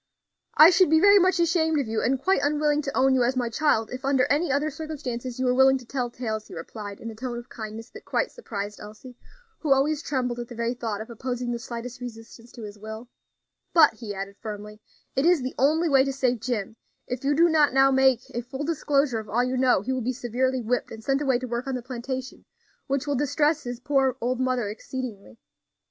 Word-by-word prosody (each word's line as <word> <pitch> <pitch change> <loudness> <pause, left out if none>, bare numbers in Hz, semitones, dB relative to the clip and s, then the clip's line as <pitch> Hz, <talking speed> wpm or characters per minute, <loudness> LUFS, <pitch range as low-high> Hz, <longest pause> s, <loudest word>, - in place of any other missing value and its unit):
"I 315 +3 +10
should 370 -2 +4
be 320 +1 +5
very 405 +3 +7
much 370 0 +3
ashamed 320 -2 +2
of 270 - -2
you, 220 0 -1
and 265 +3 +1
quite 380 +8 +2
unwilling 295 0 +1
to 275 -2 -4
own 265 0 +4
you 260 - +3
as 245 +2 +2
my 245 -2 0
child, 230 -3 +1
if 255 +2 -6
under 265 -2 +3
any 295 +1 +2
other 290 +3 0
circumstances 270 -6 -5
you 260 - -1
were 250 - +3
willing 265 +1 +5
to 255 - -12
tell 250 0 -2
tales," 220 -3 -4
he - - -10
replied, 200 +4 -8
in 230 - -6
a - - -11
tone 240 +1 -5
of 240 +1 -9
kindness 220 0 -8
that - - -11
quite - - -1
surprised 205 - -6
Elsie, 215 +4 -11 0.4
who 300 - -2
always 285 +3 +3
trembled 250 -5 -2
at 240 - -5
the 240 - -10
very 235 +1 -1
thought 225 -4 -4
of 225 +2 -8
opposing 245 +1 -3
the 235 - -3
slightest 240 0 -7
resistance 230 0 -10
to 235 - -9
his 210 0 -9
will; 220 +3 -8 0.7
"but," 320 -3 +7
he 210 -4 -7
added, 195 +1 -6
firmly, 210 0 -8 0.3
"it 270 - +2
is 340 -4 +4
the 255 - -3
only 310 +6 +3
way 270 -3 +5
to 275 - -1
save 255 -3 0
Jim; 220 -2 -3 0.3
if 250 +1 -5
you 285 +1 +2
do 335 +3 +5
not 310 -3 +4
now 270 +1 +5
make 265 -2 +4
a 240 - -2
full 265 +4 -6
disclosure 285 -5 +1
of 215 -1 -9
all 240 +3 +2
you 255 +1 -1
know, 250 -6 +3
he 260 - -1
will 260 - -2
be 250 +3 -1
severely 255 +1 -1
whipped 245 +3 -1
and 220 0 -10
sent 270 +4 +1
away 265 -4 +2
to 255 - -5
work 240 +1 -4
on 265 - -1
the 250 - -5
plantation, 255 +1 -6 0.4
which 275 0 -1
will 290 - -1
distress 295 +3 +1
his 245 -1 -5
poor 270 -1 +1
old 250 +2 -1
mother 255 -4 0
exceedingly. 210 - -7
255 Hz, 230 wpm, -25 LUFS, 235-280 Hz, 0.7 s, I